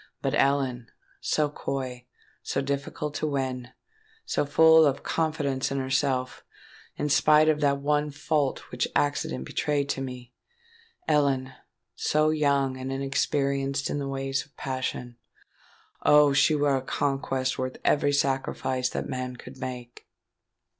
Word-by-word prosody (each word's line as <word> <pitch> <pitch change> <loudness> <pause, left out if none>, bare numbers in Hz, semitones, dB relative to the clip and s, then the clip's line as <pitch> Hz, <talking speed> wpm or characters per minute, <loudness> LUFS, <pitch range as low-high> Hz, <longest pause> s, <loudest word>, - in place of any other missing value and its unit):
But - - 0
Ellen—so 135 +2 -1
coy, 130 -4 -5 0.3
so - - -2
difficult 140 +2 -3
to 155 - -2
win,—so 145 - -4
full 160 +2 +7
of 140 -2 +1
confidence 150 -5 -1
in 140 - -1
herself, 130 -1 -1 0.5
in 150 - -2
spite 150 +2 +5
of 155 -1 +3
that 140 -1 +3
one 150 +1 +1
fault 145 -1 -1
which - - -1
accident 105 - 0
betrayed 145 - -1
to 135 - -1
me,—Ellen, 145 - -3 0.4
so 155 +1 +2
young 140 -3 +1
and 130 +1 -5
inexperienced 140 0 0
in 145 - -1
the 140 -1 -3
ways 135 0 -2
of 145 - -26
passion,—Oh! 130 +3 -1
she 145 +3 +4
were 145 -2 +2
a - - -3
conquest 135 -1 -1
worth 130 0 -3
every 145 -1 +3
sacrifice 135 -2 0
that - - -4
man 125 0 -4
could 125 +2 -12
make!" 125 -2 -7
140 Hz, 125 wpm, -27 LUFS, 130-150 Hz, 0.5 s, full